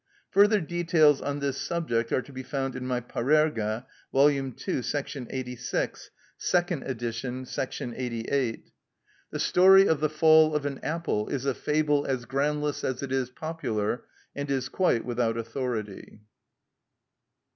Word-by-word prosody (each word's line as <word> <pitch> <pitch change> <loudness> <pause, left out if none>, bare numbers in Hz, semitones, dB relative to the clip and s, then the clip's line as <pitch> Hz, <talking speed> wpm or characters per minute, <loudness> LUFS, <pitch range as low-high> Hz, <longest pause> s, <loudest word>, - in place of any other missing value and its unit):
Further 205 +2 +5
details 165 -4 +3
on 145 0 -3
this 140 -1 -1
subject 120 -9 -1
are 130 - +1
to 140 - -14
be 130 - -5
found 135 0 -3
in 125 0 -4
my 125 -1 -1
"Parerga," 120 -3 +1 0.3
vol. 140 +2 +5
ii., 140 - -1
§ 135 0 -3
86 125 -2 -3 0.3
(second 175 -5 0
edition, 125 +1 -4
§ 125 -1 -4
88). 125 0 -2 0.6
The - - -5
story 190 +2 +6
of 160 - +2
the 155 0 +1
fall 155 0 +5
of 150 -1 -1
an 140 -2 -3
apple 150 -8 -1
is 135 -1 -3
a 135 - +1
fable 150 +1 +1
as 130 -3 -2
groundless 150 +2 -1
as 130 +1 -2
it 135 - -5
is 130 -2 0
popular, 125 -7 -3 0.3
and 140 0 -4
is 135 -1 -1
quite 180 -11 +1
without 120 -2 0
authority. 115 -3 -4
135 Hz, 145 wpm, -27 LUFS, 125-150 Hz, 0.6 s, story